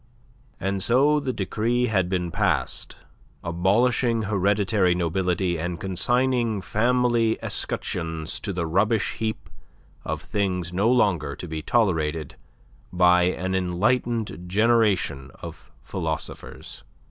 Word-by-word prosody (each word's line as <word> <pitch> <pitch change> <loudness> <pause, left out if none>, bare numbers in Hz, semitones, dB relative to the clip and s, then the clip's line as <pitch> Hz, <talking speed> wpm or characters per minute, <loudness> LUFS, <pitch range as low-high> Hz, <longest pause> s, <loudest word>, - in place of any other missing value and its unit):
And 95 0 -1
so 140 +8 +4
the 140 -3 -2
decree 115 +4 0
had 95 -6 +1
been 90 -2 -1
passed - - -1 0.5
abolishing 115 +7 +2
hereditary 100 -1 +2
nobility 90 0 0
and 85 +1 -3
consigning 120 +4 +1
family 120 +2 +1
escutcheons 80 -2 -2
to 100 - -4
the 90 -3 -2
rubbish 100 +6 +1
heap 110 -1 -3 0.6
of - - -4
things 90 -4 -2
no 100 +5 +2
longer 90 - +2
to 90 - -8
be 80 -1 -4
tolerated 80 - 0 0.6
by 90 0 +4
an 95 +1 -1
enlightened 100 +1 0
generation 100 - +2
of - - -10
philosophers. 80 -1 -6
95 Hz, 110 wpm, -24 LUFS, 90-115 Hz, 0.6 s, so